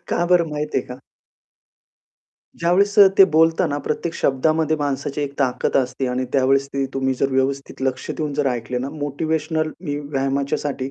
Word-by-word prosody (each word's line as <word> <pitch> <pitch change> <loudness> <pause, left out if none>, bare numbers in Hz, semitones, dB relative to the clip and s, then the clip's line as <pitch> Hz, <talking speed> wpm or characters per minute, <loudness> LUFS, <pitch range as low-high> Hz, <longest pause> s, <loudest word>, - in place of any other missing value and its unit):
का 175 - 0
बरं 170 -2 +4
माहिती 150 0 -2
आहे - - -6
का? 125 - -9 1.6
ज्यावेळेस 190 +4 +2 0.2
ते 195 - +10
बोलताना 160 -1 +3
प्रत्येक 165 +2 -2
शब्दामध्ये 155 +3 +1
माणसाची 145 0 -3
एक 145 -1 -3
ताकद 130 -3 0
असते 130 0 0
आणि 125 +1 -1
त्यावेळेस 135 +1 +2
ती 140 0 -2
तुम्ही 135 0 0
जर 135 +2 0
व्यवस्थित 135 +1 -2
लक्ष 130 -1 -2
देऊन 150 -2 -3
जर 145 0 0
ऐकले 125 0 -3
ना, 130 +2 -4
मोटिव्हेशनल 155 +2 -2
मी 145 -5 -3
व्यायामाच्यासाठी 140 -1 -2
140 Hz, 155 wpm, -21 LUFS, 135-155 Hz, 1.6 s, ते